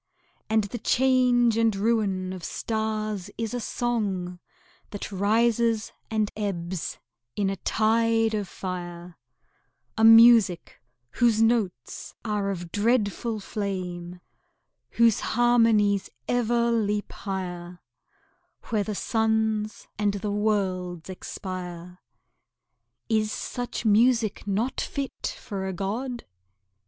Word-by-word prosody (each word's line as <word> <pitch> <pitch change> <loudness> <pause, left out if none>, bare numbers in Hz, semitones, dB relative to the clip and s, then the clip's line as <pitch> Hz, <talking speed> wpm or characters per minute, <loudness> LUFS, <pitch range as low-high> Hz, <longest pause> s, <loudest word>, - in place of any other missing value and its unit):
And 220 0 +3
the 220 +4 -5
change 245 -1 +3
and 225 -2 +3
ruin 195 -3 0
of 185 -2 -8
stars 215 -3 -3
is 225 0 -3
a 245 - -1
song 200 -7 -2 0.5
That 205 0 -6
rises 225 +3 +2 0.2
and 215 -2 0
ebbs 185 -4 -3 0.4
in 195 -1 0
a - - -2
tide 225 +2 +2
of 205 -2 -2
fire 175 -2 -7 0.8
A - - +3
music 225 -5 +6 0.3
whose 235 -3 +2
notes 220 - -1
are 210 -2 -1
of 175 -3 -5
dreadful 220 0 0
flame, 180 -4 -5 0.7
Whose 230 -2 +4
harmonies 225 -4 +3 0.2
ever 235 -1 +1
leap 210 -2 0
high'r 180 -3 -5 0.9
Where 215 -3 +1
the 210 0 -4
suns 220 -1 0
and 205 -1 +1
the 205 +1 -3
worlds 190 -4 -1
expire. 180 -1 -7 1.1
Is 215 -2 +1
such 245 0 -4
music 225 -1 +3
not 220 +6 -1
fit 275 -2 -4
for 195 -2 -5
a 190 - -3
god? 235 +7 -4
210 Hz, 105 wpm, -26 LUFS, 190-230 Hz, 1.1 s, music